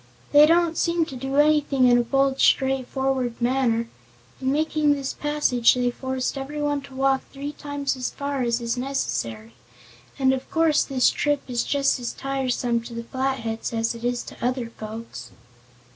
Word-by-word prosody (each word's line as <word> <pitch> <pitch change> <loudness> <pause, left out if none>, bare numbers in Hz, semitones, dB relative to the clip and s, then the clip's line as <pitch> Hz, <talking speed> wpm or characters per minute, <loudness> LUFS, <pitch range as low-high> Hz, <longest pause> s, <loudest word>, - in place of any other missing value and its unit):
"They 295 +1 +8
don't 335 0 +2
seem 335 -1 +1
to 270 - -9
do 270 +2 -4
anything 295 -3 +4
in 245 0 +5
a - - +2
bold 270 +2 +1
straightforward 265 -2 +1
manner. 240 -2 +1 0.5
In 260 0 +1
making 305 0 +2
this 275 -2 -3
passage 290 -6 +2
they 245 -1 +1
forced 260 +1 -3
everyone 290 +1 -2
to 265 - -13
walk 270 0 +2
three 285 +1 -5
times 285 -2 -3
as 255 -1 -3
far 280 -1 -3
as 235 -1 0
is 235 0 -2
necessary. 115 - -3 0.6
And 265 -1 +3
of 265 - -5
course 325 -2 +3
this 265 -3 +2
trip 290 -1 0
is 240 -2 -1
just 280 -2 +1
as 240 - -4
tiresome 255 -3 -1
to 235 - -8
the 235 - -4
Flatheads 240 -3 -3
as 225 0 0
it 230 0 -10
is 245 0 -1
to - - -11
other 245 -1 -1
folks." 215 - -8
265 Hz, 170 wpm, -24 LUFS, 240-285 Hz, 0.6 s, They